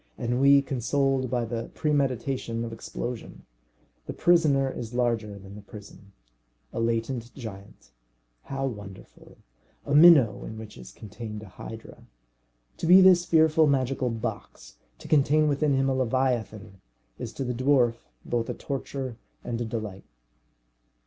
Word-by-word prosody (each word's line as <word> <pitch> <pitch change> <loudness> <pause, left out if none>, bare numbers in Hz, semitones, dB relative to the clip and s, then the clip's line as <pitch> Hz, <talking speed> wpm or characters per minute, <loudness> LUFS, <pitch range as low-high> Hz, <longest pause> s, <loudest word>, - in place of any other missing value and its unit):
Ennui 140 +4 +4
consoled 135 0 0
by 120 -1 -1
the 115 0 -5
premeditation 135 -5 -1
of 115 - -7
explosion! 120 +1 -7 0.6
The - - -4
prisoner 155 -6 +3
is 120 -2 -6
larger 115 -4 -1
than 100 0 -12
the 105 - -10
prison. 100 -1 -13 0.6
A - - -3
latent 115 +1 -2
giant! 105 -6 -10 0.5
how 135 0 -3
wonderful! 105 -6 -9 0.5
A 145 - -2
minnow 145 -10 +7
in 110 - -8
which 110 -1 -10
is 60 - -12
contained 105 0 -8
a 105 - -12
hydra. 110 +4 -11 0.7
To - - -3
be 180 +2 +9
this 185 -2 +6
fearful 160 -2 +4
magical 130 -2 0
box, 110 - -6 0.2
to - - -12
contain 150 +1 +3
within 145 0 +1
him 135 0 +1
a 135 - +1
leviathan, 115 -6 -2 0.4
is 115 - -5
to 135 - -4
the 125 -1 -2
dwarf 125 -2 +1 0.2
both 120 -1 -2
a - - -3
torture 135 -3 -5 0.3
and 120 0 -4
a - - -1
delight. 110 -4 -6
125 Hz, 140 wpm, -26 LUFS, 110-140 Hz, 0.7 s, be